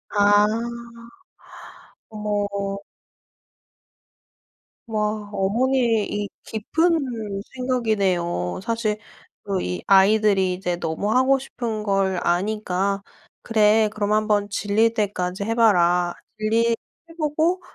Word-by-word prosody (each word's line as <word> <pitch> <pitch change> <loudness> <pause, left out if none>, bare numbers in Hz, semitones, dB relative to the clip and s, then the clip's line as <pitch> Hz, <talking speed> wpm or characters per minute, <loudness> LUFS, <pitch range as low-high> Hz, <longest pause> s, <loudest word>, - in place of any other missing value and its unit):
아. 205 0 +5 1.7
어머. 210 -1 -2 2.4
와 210 -1 -2
어머니의 230 +3 +1
이 205 -1 -2
깊은 235 - -1
생각이네요. 200 - 0
사실 230 -2 -1 0.5
그 195 -2 -2
이 90 -1 -3
아이들이 195 -1 +4
이제 180 -1 -2
너무 170 +5 -2
하고 265 +1 +4
싶은 235 -5 -5
걸 195 -2 +1
아니까 195 +1 0 0.4
그래 215 -1 +3
그럼 205 -1 -1
한번 210 -1 +1
질릴 215 +3 +1
때까지 195 -3 -2
해 225 +2 -1
봐라. 180 -6 +3 0.2
질리게 225 +2 +1 0.4
해 - - -12
보고 320 +4 0
210 Hz, 190 characters per minute, -23 LUFS, 195-225 Hz, 2.4 s, 아